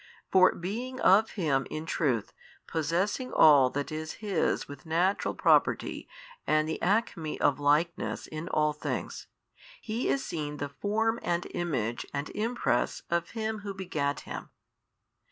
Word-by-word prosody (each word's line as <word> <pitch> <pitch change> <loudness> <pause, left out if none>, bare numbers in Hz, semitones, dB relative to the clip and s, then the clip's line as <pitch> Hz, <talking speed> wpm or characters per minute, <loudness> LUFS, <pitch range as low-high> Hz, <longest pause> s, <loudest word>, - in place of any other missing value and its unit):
For 185 -1 +6
being 240 +9 -4
of 210 +4 +5
Him 140 - 0
in 155 +1 -5
truth, 130 - 0 0.3
possessing 180 - -1
all 140 -4 +7
that 145 +4 -3
is 155 0 -4
His 200 -6 -1
with 145 -1 -10
Natural 175 +5 +1
Property - - +2 0.4
and 155 0 +3
the 160 - -3
acme 185 -5 0
of 140 -1 +2
likeness 150 +4 +1
in 155 +3 -6
ail 150 0 +2
things, 150 - -4 0.5
He 225 +2 -3
is 275 - 0
seen 150 -4 -4
the 145 0 -4
Form 220 +9 0
and 175 0 -1
Image 120 -10 -2
and 140 +1 -3
Impress 230 +3 -1
of 170 0 0
Him 220 0 -2
Who 200 -1 -6
begat 150 -7 -2
Him. - - -7
170 Hz, 140 wpm, -29 LUFS, 150-205 Hz, 0.5 s, all